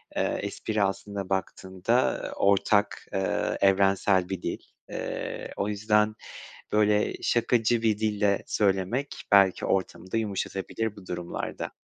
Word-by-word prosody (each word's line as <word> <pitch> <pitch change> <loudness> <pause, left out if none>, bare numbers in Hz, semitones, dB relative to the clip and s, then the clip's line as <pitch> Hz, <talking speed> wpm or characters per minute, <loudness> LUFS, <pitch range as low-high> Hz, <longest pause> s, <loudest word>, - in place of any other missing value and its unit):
eee, - - 0
espri 105 -2 -2
aslında 100 0 -3
baktığında, 95 +5 0
ııı, - - -4
ortak, 100 +1 +2
eee, 95 0 0
evrensel 95 -1 +3
bir 95 -2 -3
dil. - - -3 0.3
Eee, - - -5
o 100 - -1
yüzden, 105 +1 +2 0.6
böyle, 105 0 +3
şakacı 120 -1 +2
bir 110 -2 +2
dille 105 -2 +1
söylemek 100 +7 0 0.2
belki 100 -2 +5
ortamı 95 -1 -2
da - - +1
yumuşatabilir 105 0 -3
bu 95 -3 -13
durumlarda. 90 -1 -4
100 Hz, 120 wpm, -27 LUFS, 95-110 Hz, 0.6 s, belki